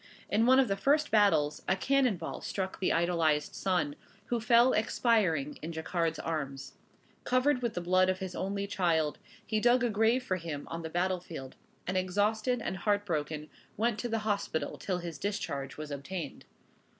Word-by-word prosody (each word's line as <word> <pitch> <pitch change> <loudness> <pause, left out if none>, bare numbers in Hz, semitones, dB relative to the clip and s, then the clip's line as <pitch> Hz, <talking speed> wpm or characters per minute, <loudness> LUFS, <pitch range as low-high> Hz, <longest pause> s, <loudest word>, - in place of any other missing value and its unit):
In 225 +3 +3
one 260 +1 +7
of 265 - +4
the 195 - 0
first 295 +8 +2
battles 160 -9 +3
a - - +3
cannon 255 0 +2
ball - - -6
struck 190 -1 -4
the 190 - +1
idolized 165 -3 +1
son, 245 +10 0 0.3
who 240 - +1
fell 240 +2 +5
expiring 210 - +1
in 160 - -5
Jacquard's 165 0 -1
arms. 135 -4 -4 0.5
Covered 255 +1 +2
with 235 -3 -2
the 175 - -2
blood 185 +1 +3
of 185 - +1
his 185 -1 -5
only 200 +1 -2
child, 165 -6 0 0.3
he 215 -1 0
dug 245 +2 +4
a 240 - +1
grave 225 +4 +2
for 185 -7 -1
him 160 -4 -6
on 165 0 -4
the 160 - -5
battle 180 +2 0
field; 155 -7 -9 0.3
and 185 +1 -1
exhausted 215 +6 +1
and 190 - -3
heart 205 +2 +1
broken 155 -3 -2 0.3
went 225 0 +1
to 240 - -3
the 225 - 0
hospital 200 -6 -1
till 185 -2 -2
his 170 -4 -6
discharge 140 -9 -3
was 155 -1 -6
obtained. 145 +2 -6
185 Hz, 180 wpm, -31 LUFS, 160-225 Hz, 0.5 s, one